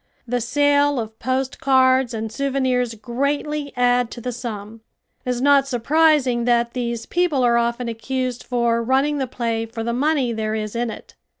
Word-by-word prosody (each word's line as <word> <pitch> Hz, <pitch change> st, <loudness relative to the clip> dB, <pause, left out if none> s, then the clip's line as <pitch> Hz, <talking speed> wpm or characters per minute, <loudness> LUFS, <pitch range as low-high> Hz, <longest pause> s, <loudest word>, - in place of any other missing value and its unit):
The 245 Hz, +1 st, -1 dB
sale 285 Hz, +3 st, +2 dB
of 220 Hz, -1 st, -6 dB
post 260 Hz, +1 st, -2 dB
cards 260 Hz, -2 st, +3 dB
and 220 Hz, -1 st, -4 dB
souvenirs 255 Hz, -2 st, 0 dB
greatly 280 Hz, +6 st, -2 dB
add 245 Hz, -1 st, +2 dB
to 240 Hz, -, -8 dB
the 250 Hz, +1 st, -4 dB
sum. 225 Hz, -2 st, -7 dB, 0.4 s
It -, -, -3 dB
is 250 Hz, -1 st, -1 dB
not 280 Hz, -1 st, +5 dB
surprising 270 Hz, -1 st, +2 dB
that 235 Hz, -1 st, +2 dB
these 235 Hz, -2 st, -3 dB
people 345 Hz, -7 st, +1 dB
are 240 Hz, -1 st, +4 dB
often 235 Hz, +1 st, -1 dB
accused 250 Hz, +2 st, -3 dB
for 235 Hz, -2 st, 0 dB
running 270 Hz, +5 st, +1 dB
the 265 Hz, -, -1 dB
play 230 Hz, -2 st, -2 dB
for 225 Hz, 0 st, -6 dB
the 235 Hz, +1 st, -2 dB
money 270 Hz, -2 st, +1 dB
there 220 Hz, -1 st, -2 dB
is 215 Hz, 0 st, -4 dB
in 240 Hz, 0 st, -1 dB
it. 215 Hz, -, -10 dB
245 Hz, 175 wpm, -21 LUFS, 235-270 Hz, 0.4 s, not